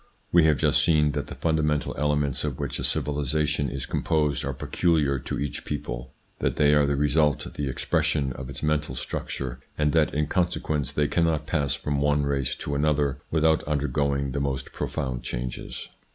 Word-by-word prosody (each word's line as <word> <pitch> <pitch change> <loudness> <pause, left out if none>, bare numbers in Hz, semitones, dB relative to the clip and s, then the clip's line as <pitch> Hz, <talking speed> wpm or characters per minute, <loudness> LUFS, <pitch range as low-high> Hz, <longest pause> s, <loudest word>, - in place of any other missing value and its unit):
We 85 -2 +6
have 75 -3 +4
just - - +3
seen 75 -3 +4
that 70 0 -3
the - - -7
fundamental 75 -2 0
elements 75 -2 0
of 75 -4 -2
which 70 -4 -3
a - - -3
civilisation 75 0 0
is 65 +1 -3
composed 75 -3 0
are - - -1
peculiar 75 -6 +1
to - - -4
each 70 - -3
people, 65 -3 -5 0.3
that - - 0
they 75 -1 +4
are 75 -1 +4
the 70 - +1
result, 75 0 +2
the 70 -2 -2
expression 65 +1 0
of 65 0 -7
its 70 - -7
mental 75 -3 0
structure, 65 0 -4 0.2
and 75 -1 +2
that 80 -1 +3
in 75 0 +2
consequence 75 -3 0
they 75 0 +1
cannot 80 -2 +1
pass 75 -4 0
from 70 -1 -2
one 75 0 +2
race 70 -2 0
to 70 - -4
another 70 -2 +1
without 80 0 +3
under 75 -1 0
going 70 -2 0
the 70 - -2
most 70 -1 -2
profound 65 -5 -3
changes. - - -5
75 Hz, 180 wpm, -26 LUFS, 70-75 Hz, 0.3 s, We